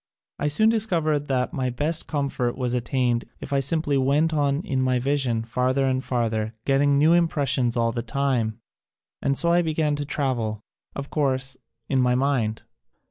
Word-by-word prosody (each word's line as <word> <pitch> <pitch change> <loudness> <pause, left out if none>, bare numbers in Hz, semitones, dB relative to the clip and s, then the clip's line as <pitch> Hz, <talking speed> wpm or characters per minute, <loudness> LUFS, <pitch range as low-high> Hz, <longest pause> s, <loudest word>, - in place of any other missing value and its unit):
I 145 - 0
soon 215 +10 +4
discovered 165 -10 0
that 130 +2 -1
my 130 -5 -1
best 150 +7 0
com 145 -3 -1
fort 125 -3 -2
was 125 -2 -1
attained 125 -1 0
if 140 - -6
I 140 - +3
simply 145 0 0
went 145 +5 +2
on 145 -1 +1
in 130 -1 -1
my 130 -1 +2
vision 130 -3 0
farther 130 +4 0
and 130 0 0
farther, 115 -3 -1
getting 140 +1 +3
new 155 +4 +5
impressions 140 -7 +1
all 115 0 +2
the 120 0 -3
time, 120 -3 -1 0.6
and 140 0 0
so 170 - +5
I 175 +1 +4
began 155 -2 0
to 145 - -2
travel 120 -7 -2 0.2
— - - -42
of 140 0 -6
course, 135 -3 0 0.3
in 135 -2 +1
my 125 0 +2
mind. 125 -5 0
135 Hz, 180 wpm, -24 LUFS, 125-145 Hz, 0.6 s, new